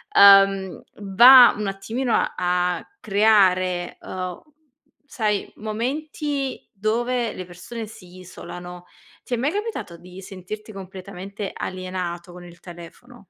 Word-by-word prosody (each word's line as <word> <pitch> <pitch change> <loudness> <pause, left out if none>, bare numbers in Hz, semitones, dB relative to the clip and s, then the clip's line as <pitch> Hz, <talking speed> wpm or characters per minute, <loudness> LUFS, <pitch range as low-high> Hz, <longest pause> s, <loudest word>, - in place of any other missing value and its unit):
ehm, 195 -1 +6 0.2
va 240 +6 +8
un 210 -1 -3
attimino 225 +6 -3
a - - +1
a 180 0 -1
creare, 185 -4 +2
ehm, 185 -1 -6 0.6
sai 215 -6 -2
momenti 275 +5 -4
dove 230 +3 -1
le 185 - -7
persone 220 +6 -8
si 185 -4 -14
isolano. 180 0 -10 0.4
Ti 245 - -3
è - - -4
mai 275 +6 0
capitato 415 - -5
di 180 +2 -12
sentirti 200 +3 -9
completamente 195 +1 -8
alienato 185 -1 -5
con 180 0 -12
il 170 -1 -15
telefono? 175 +8 -13
195 Hz, 115 wpm, -22 LUFS, 180-230 Hz, 0.6 s, va